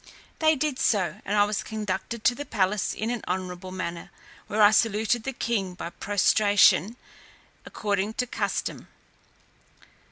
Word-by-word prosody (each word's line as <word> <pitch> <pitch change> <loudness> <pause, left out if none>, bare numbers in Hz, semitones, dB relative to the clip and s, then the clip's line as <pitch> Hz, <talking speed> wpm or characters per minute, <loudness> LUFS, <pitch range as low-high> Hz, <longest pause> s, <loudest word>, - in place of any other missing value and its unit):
They 315 0 +4
did 285 -2 -2
so, 195 -2 +1
and 205 +1 0
I 205 - +6
was 210 0 -1
conducted 215 +1 -4
to 245 - +4
the 285 - -6
palace 205 -5 0
in 220 +2 -2
an 240 -3 -4
honourable 185 0 -4
manner, 175 -2 -5 0.4
where 215 - -3
I 205 - +8
saluted 220 +1 +1
the 270 - -1
king 205 -7 -2
by 170 - -6
prostration, 205 +1 +3 0.7
according 205 0 -2
to 250 - 0
custom. 245 - -3
210 Hz, 140 wpm, -26 LUFS, 190-230 Hz, 0.7 s, I